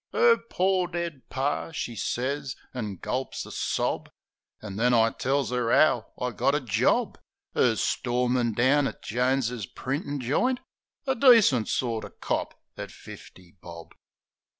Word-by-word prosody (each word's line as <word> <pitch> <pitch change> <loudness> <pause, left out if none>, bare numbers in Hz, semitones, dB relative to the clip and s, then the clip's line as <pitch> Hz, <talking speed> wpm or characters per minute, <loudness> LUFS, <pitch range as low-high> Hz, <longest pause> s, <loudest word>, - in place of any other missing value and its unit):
" - - -44
'Er 465 0 +6
pore 185 0 +1
dead 170 -5 -4
Par," 140 +4 -2
she 120 -6 -4
sez, 135 +5 -2 0.2
an' 110 -6 -4
gulps 130 +8 -4
a - - -10
sob. - - -1 0.5
An' 100 -3 -8
then 120 +2 +3
I 115 0 +4
tells 135 -1 -1
'er 120 -2 0
'ow 125 -7 +4
I 125 0 -1
got 140 +5 +1
a - - +2
job, 120 -9 +1 0.3
As - - +2
storeman 125 -1 0
down 135 +5 +3
at - - -8
Jones' 125 -3 0
printin' 140 - -4
joint, 240 - +1 0.5
A 265 - +2
decent 230 - +5
sorter 115 -3 -2
cop - - -3 0.2
at - - -6
fifty 90 -1 -13
bob. 85 -1 -11
130 Hz, 145 wpm, -27 LUFS, 120-145 Hz, 0.5 s, Er